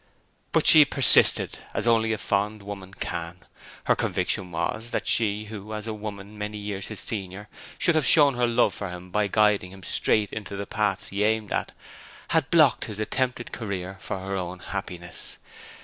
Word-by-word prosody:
But - - +2
she 155 - +10
persisted 135 -2 +5 0.2
as - - -1
only 115 -1 +3
a 110 - -1
fond 105 +1 -1
woman 100 -1 -9
can. 85 +2 -5 0.4
Her - - +2
conviction 90 - -1
was 110 +7 -3
that - - -3
she 105 -1 +1
who, 105 0 -8
as 105 0 -5
a 110 - -4
woman 105 -1 -8
many 105 +1 -4
years 100 -1 -5
his 110 -4 -7
senior, 100 0 -6 0.3
should 170 - +2
have 155 -4 +1
shown 145 -3 +6
her 120 0 +1
love 120 +1 +2
for 100 - -5
him 90 0 -9
by 105 +1 +1
guiding 105 -3 +2
him 95 -1 -13
straight 105 +1 0
into 105 -2 -6
the 100 0 -5
paths 105 -3 -2
he 100 +1 -1
aimed 110 -1 0
at, - - -2 0.6
had - - +1
blocked - - +4
his 105 - -6
attempted 125 +2 -2
career 95 -3 -5
for - - -4
her 95 +1 -5
own 90 -1 -4
happiness. 85 0 -4
105 Hz, 180 wpm, -25 LUFS, 95-110 Hz, 0.6 s, she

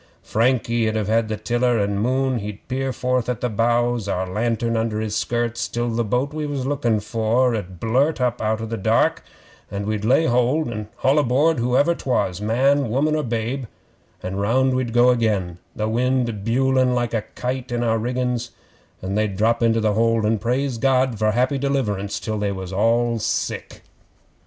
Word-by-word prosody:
Frankie 115 -1 +1
'ud 110 - -3
have 110 +1 +1
the 110 -1 -3
tiller 120 +3 +1
and 100 -1 0
Moon 130 +1 +1
he'd 105 0 -8
peer 135 +1 -2
forth 125 -1 -1
at 125 -3 -2
the 125 - -1
bows, 120 0 +1
our 95 -1 -1
lantern 115 +4 -1
under 110 -1 -1
his 110 -1 -3
skirts, 120 +2 -1
till 120 0 -2
the 115 +1 0
boat 125 +7 -1
we 155 -1 -3
was 140 -3 -3
lookin' 125 -6 0
for 115 +4 +1
'ud 95 -5 -5
blurt 130 +8 +1
up 125 -1 0
out 110 0 0
o' - - -3
the 115 +1 -4
dark, 95 - +2 0.5
and 100 0 -4
we'd 105 -1 -2
lay 130 +8 +3
hold 125 +6 +2
and 105 -2 -5
haul 135 +3 +2
aboard 145 +3 +2
whoever 125 +7 +2
'twas 115 - -1
man, 130 +5 +2
woman, 145 +6 +1
or 155 - +1
babe 120 +1 -2 0.6
an' 95 +1 -4
round 130 +6 +2
we'd 130 -2 -1
go 120 +1 +5
again, 100 -8 0 0.2
the 110 - -1
wind 120 -2 0
bewling 130 +2 +2
like 120 -1 -1
a 110 - +1
kite 125 0 -3
in 120 0 -1
our 115 -1 +1
riggin's, 125 0 -2 0.5
and 95 +1 -3
they'd 105 -3 0
drop 115 +3 +2
into 115 -1 +3
the 110 -1 +1
hold 115 0 +2
and 110 -1 +1
praise 125 +1 -1
God 130 -3 +2
for 110 0 +2
happy 125 +5 +1
deliverance 110 -8 -1
till 110 -1 -3
they 100 -1 0
was 95 -1 -6
all 115 +3 +2
sick. - - -3
120 Hz, 185 wpm, -22 LUFS, 110-125 Hz, 0.6 s, go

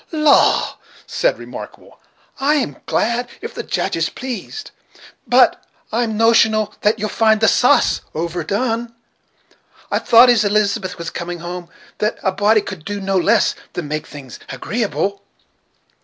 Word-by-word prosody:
"Law!" 305 -3 +3 0.3
said - - 0
Remarkable, - - -11 0.4
"I'm 280 -1 +1
glad 235 +2 0
if 460 - -7
the - - -5
Judge - - -2
is - - 0
pleased; 260 - -7 0.6
but - - +4 0.3
I'm 225 -1 -1
notional 220 -2 +3
that 210 +1 +2
you'll 215 - -2
find 220 +1 +2
the 220 - +3
sa'ce 250 +6 +3
over 170 +2 -3
done. 230 +2 -2 1.0
I - - +2
thought, 245 +1 +6
as 230 -2 +3
Elizabeth 205 -2 0
was 170 -1 -6
coming 175 0 -5
home, 175 0 -7 0.3
that 215 +1 0
a 190 - +2
body 205 +3 +3
could 190 -5 -8
do 205 +4 -4
no 195 0 -2
less 210 +5 +3 0.2
than 160 -5 -5
make 155 0 -4
things 135 -4 -11
agreeable." 200 -3 -2
215 Hz, 140 wpm, -19 LUFS, 190-235 Hz, 1.0 s, thought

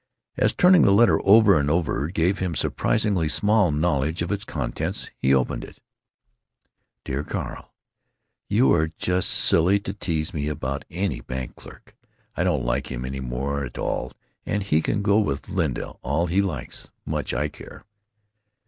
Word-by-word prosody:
As - - +1
turning 180 -1 +6
the - - +5
letter 115 +4 +5
over 100 -3 +6
and 70 0 0
over 80 -3 0
gave 90 +3 0
him 90 -3 -2
surprisingly 100 -5 0
small 105 +2 +3
knowledge 75 +1 0
of 85 - -4
its 100 0 -1
contents, 65 -11 -4
he 65 - +2
opened 65 -2 +1
it: - - -12 1.3
Dear 70 +2 -3
Carl,—You 105 - -3
are 80 -1 +2
just 90 0 0
silly 90 +5 +4
to 95 - -5
tease 85 -3 -2
me 75 -2 -2
about 70 -2 -4
any 95 +3 -2
bank 65 -1 -6
clerk. - - -15 0.4
I - - 0
don't 60 - 0
like - - -1
him 60 -1 -4
any 65 +1 -5
more 65 +3 -3
at 60 - -7
all - - -3 0.3
and 105 0 -2
he 80 -5 +2
can 105 +4 -1
go 100 +1 +4
with 70 -10 -2
Linda - - -2
all 75 +7 0
he 90 +3 +1
likes, 80 -10 -5 0.2
much - - -3
I 70 +5 0
care! - - -13
80 Hz, 160 wpm, -24 LUFS, 70-100 Hz, 1.3 s, turning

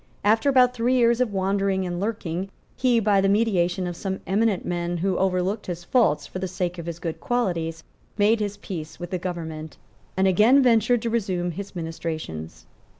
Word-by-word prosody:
After 220 +6 +3
about 250 -2 +5
three 250 +1 +1
years 235 0 +3
of 245 -4 +1
wandering 195 0 0
and 175 -1 -3
lurking 190 -3 -3 0.3
he, 250 -2 +3
by 205 -3 +3
the 195 - +2
mediation 190 -4 +1
of 175 -1 -4
some 190 +2 -4
eminent 205 0 +1
men, 175 0 -2
who 185 +2 0
overlooked 190 +3 0
his 175 -1 -5
faults 220 - +2
for 185 - -7
the 190 - -2
sake 180 -1 -3
of 170 - -7
his 170 -1 -4
good 165 -2 -5
qualities, 170 -9 -1 0.3
made 215 +2 +3
his 205 -1 -3
peace 165 -6 -7
with 175 0 -7
the 185 - -1
government, 160 -3 -6 0.4
and 190 0 +3
again 220 +9 +5
ventured 240 -1 +3
to 230 - -1
resume 185 -6 -1
his 200 +4 -7
ministrations. 155 - -5
190 Hz, 185 wpm, -24 LUFS, 175-220 Hz, 0.4 s, about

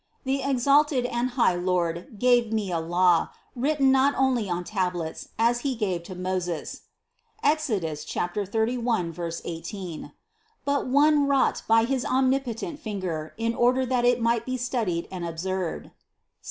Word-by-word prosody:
The 270 +1 0
exalted 275 0 +3
and 240 +1 -1
high 230 -7 +4
Lord 175 +2 -1
gave 240 -1 +3
me 210 -4 -1
a 170 - 0
law, 175 +1 +3 0.3
written 275 +1 +2
not 270 +2 +3
only 255 -6 +1
on 175 0 -2
tablets, 180 -5 -3
as 235 +2 +3
He 265 0 -2
gave 190 -6 -1
to 185 - -8
Moses 180 -2 -3 0.6
(Exod. 290 - +1
31, 200 +5 -1 0.3
18), 170 -2 -6 0.5
but 280 -1 0
one 290 +2 +4
wrought 275 -1 +2
by 225 0 +5
his 260 0 -1
omnipo 260 -2 +1
tent 300 +5 -6
finger 185 - -4
in 230 +1 0
order 250 +2 +2
that 250 -1 0
it 245 0 +3
might 230 -1 +1
be 255 +1 -3
studied 230 -9 -2
and 185 -2 -5
ob 165 -1 -5
served 185 0 -2
(Ps. - - -18
230 Hz, 150 wpm, -26 LUFS, 180-260 Hz, 0.6 s, by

